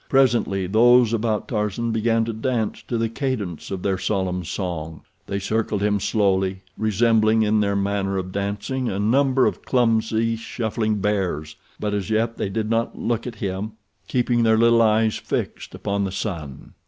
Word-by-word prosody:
Presently 120 -8 +2
those 120 +4 +5
about 110 -1 0
Tarzan 110 +1 -1
began 115 0 +1
to 115 - -3
dance 110 -1 -2
to 120 - -1
the 115 0 +1
cadence 115 - -3
of 95 -2 -4
their 95 -2 0
solemn 95 -2 -1
song. 80 -3 -4 0.3
They 100 - -2
circled 105 0 -1
him 105 -1 +2
slowly, 95 -2 +1
resembling 110 +1 +3
in 105 0 +2
their 100 -1 +1
manner 100 -1 0
of 95 -1 -4
dancing 100 +6 -2
a 95 - -3
number 130 +5 +3
of - - -1
clumsy, 115 -2 +1
shuffling 110 -1 -2
bears; 90 -8 -1 0.2
but 105 -1 -2
as 100 -1 -2
yet 115 +1 0
they 100 - -2
did 110 +2 -2
not 115 +1 -1
look 115 0 -2
at 120 - -6
him, 100 +1 -4 0.3
keeping 120 -1 +1
their 110 -1 +4
little 115 0 +5
eyes 110 0 +3
fixed - - -4
upon 100 -1 -1
the 95 - -3
sun. 85 -9 -5
110 Hz, 165 wpm, -23 LUFS, 100-115 Hz, 0.3 s, those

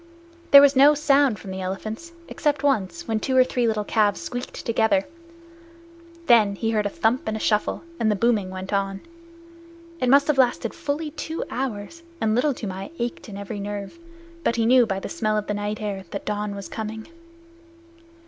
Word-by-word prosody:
There 280 0 +10
was 285 0 +5
no 285 +3 +7
sound 280 -5 +3
from 190 - -9
the 190 0 -5
elephants, 215 - -5 0.2
except 295 -1 -1
once, 275 - 0
when 220 -1 0
two 260 +3 0
or 255 - +8
three 245 -2 0
little 215 -2 0
calves 205 -1 +1
squeaked 245 +1 -6
together. 230 +5 +2 1.2
Then 220 -7 +5
he 225 +2 -1
heard 210 -2 +1
a - - -3
thump 225 +5 0
and 220 0 -1
a - - -6
shuffle, 210 +6 0 0.2
and 220 - +2
the 210 - +2
booming 215 -3 +1
went 185 +1 -6
on. 195 -1 -1 1.0
It 255 - +1
must 280 +2 +6
have 295 -3 +1
lasted 240 -3 +2
fully 300 +2 -3
two 320 +1 -5
hours, 255 +4 -4 0.2
and 215 -5 +1
Little 260 +4 +1
Toomai 195 -2 -6
ached 235 -1 -4
in 200 - -8
every 200 +1 -6
nerve, 205 +8 -6 0.4
but - - +1
he 230 -1 +1
knew 245 0 +5
by 195 -2 -2
the - - -6
smell 215 -1 -1
of 210 - -2
the 210 - -2
night 205 +1 -3
air 205 -2 -3
that 190 -3 -12
the 200 - -4
dawn 210 -1 -3
was 200 -1 -7
coming. 220 0 -6
220 Hz, 195 wpm, -24 LUFS, 205-260 Hz, 1.2 s, There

